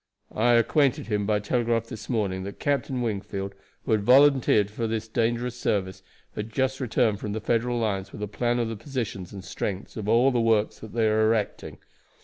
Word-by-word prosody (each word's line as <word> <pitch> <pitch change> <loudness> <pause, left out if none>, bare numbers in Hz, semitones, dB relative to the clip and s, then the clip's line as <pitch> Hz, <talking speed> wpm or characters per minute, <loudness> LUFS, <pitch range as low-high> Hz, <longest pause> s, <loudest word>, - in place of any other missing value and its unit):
I 120 - +3
acquainted 130 +3 +3
him 105 -2 0
by 105 -1 +2
telegraph 115 +1 0
this 115 -2 -9
morning 100 -6 -1
that 100 - -7
Captain 135 -3 -1
Wingfield, 100 -3 -3 0.3
who - - -2
had 110 -1 +3
volunteered 125 -4 +5
for 115 +2 -2
the 110 0 -1
dangerous 115 +2 -1
service, 95 -5 -1 0.3
had 105 +1 -5
just 130 +3 0
returned 115 -4 +1
from 105 - -4
the 110 - -2
Federal 120 +2 0
lines 100 -4 -2
with 105 - -7
a - - -2
plan 120 +4 -1
of 120 -1 0
the 115 - -4
positions 115 - -5
and 95 -2 -8
strength 100 -1 -4
of 105 -1 -3
all 120 +4 +5
the 120 -2 +1
works 110 -2 +1
that 110 - -10
they 115 -1 +2
are 110 0 +3
erecting. 110 -2 -1
110 Hz, 195 wpm, -26 LUFS, 105-120 Hz, 0.3 s, volunteered